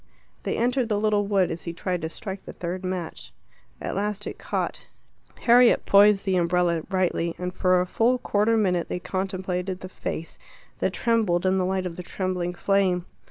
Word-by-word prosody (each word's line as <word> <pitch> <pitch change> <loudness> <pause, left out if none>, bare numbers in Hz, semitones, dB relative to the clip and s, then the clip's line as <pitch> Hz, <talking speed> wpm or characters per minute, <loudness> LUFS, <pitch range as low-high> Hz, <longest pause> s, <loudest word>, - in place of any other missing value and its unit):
They - - -2
entered 245 0 +1
the 210 -1 +1
little 210 -1 +1
wood 195 -3 +2
as 165 - -6
he 170 - -4
tried 180 +1 -2
to 160 - -3
strike 190 +3 -6
the - - -10
third 180 +2 -5
match. 185 -3 -5 0.5
At - - -4
last 210 +1 -2
it - - -6
caught. - - -3 0.5
Harriet 245 0 +5
poised 200 0 +5
the 190 -2 +2
umbrella 175 -1 +2
rightly, 180 -3 0
and 180 0 -4
for 185 0 +3
a 180 - +1
full 230 +7 +2
quarter 225 -1 +1
minute 180 -5 +1
they - - -2
contemplated 185 0 -3
the 185 - -7
face 165 -3 -6 0.4
that - - 0
trembled 215 -7 +1
in 190 0 +3
the 185 - +1
light 190 0 -1
of 170 -2 -5
the - - -4
trembling 180 -1 -3
flame. 185 -2 +1
185 Hz, 185 wpm, -25 LUFS, 180-205 Hz, 0.5 s, Harriet